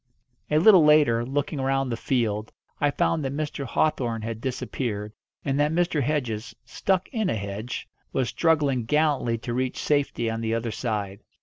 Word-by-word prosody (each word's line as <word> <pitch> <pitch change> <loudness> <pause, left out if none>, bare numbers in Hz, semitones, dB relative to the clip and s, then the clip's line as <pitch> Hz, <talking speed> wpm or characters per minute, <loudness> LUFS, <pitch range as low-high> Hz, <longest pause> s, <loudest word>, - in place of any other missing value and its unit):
A 150 - +3
little 185 0 +7
later, 150 -6 +5
looking 140 +2 -2
round 135 -1 0
the - - 0
field, 110 -3 -1 0.3
I 145 - +3
found 155 +2 0
that 135 - -2
Mr. 150 -2 -3
Hawthorn 120 -4 0
had 115 0 -5
disappeared, 110 -5 -3 0.3
and 140 0 0
that 150 +1 +3
Mr. 165 -2 +1
Hedges, 125 -6 -2
stuck 185 +10 0
in 220 -6 -1
a - - 0
hedge, 100 +3 -5 0.2
was 130 -2 0
struggling 140 -3 +1
gallantly 145 -4 +1
to 120 +1 -5
reach 130 +1 -1
safety 145 -5 0
on 115 0 -2
the 115 0 0
other 115 0 -2
side. 105 -4 -3
130 Hz, 170 wpm, -25 LUFS, 115-150 Hz, 0.3 s, little